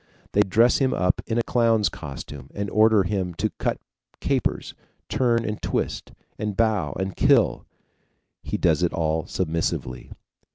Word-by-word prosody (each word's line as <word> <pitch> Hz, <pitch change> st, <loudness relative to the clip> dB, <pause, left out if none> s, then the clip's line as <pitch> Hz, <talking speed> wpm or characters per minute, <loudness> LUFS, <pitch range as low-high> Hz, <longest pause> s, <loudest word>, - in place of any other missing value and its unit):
They 105 Hz, -, +4 dB
dress 110 Hz, +5 st, +4 dB
him 130 Hz, -2 st, +2 dB
up 90 Hz, 0 st, +1 dB
in 115 Hz, -, -1 dB
a 120 Hz, -, +2 dB
clown's 115 Hz, -4 st, +2 dB
costume, 70 Hz, -3 st, -8 dB
and 100 Hz, 0 st, -3 dB
order 110 Hz, -2 st, +5 dB
him 90 Hz, -2 st, -2 dB
to -, -, -1 dB
cut -, -, 0 dB, 0.4 s
capers, -, -, -1 dB, 0.4 s
turn 120 Hz, -2 st, +1 dB
and 105 Hz, 0 st, -4 dB
twist -, -, -2 dB, 0.3 s
and 105 Hz, -2 st, -3 dB
bow, 105 Hz, -11 st, +1 dB
and 95 Hz, -1 st, -3 dB
kill -, -, +3 dB, 0.7 s
he -, -, -3 dB
does 80 Hz, -2 st, +2 dB
it 90 Hz, -, +1 dB
all 80 Hz, -1 st, -1 dB
submissively. 80 Hz, -7 st, -3 dB
100 Hz, 150 wpm, -24 LUFS, 85-110 Hz, 0.7 s, order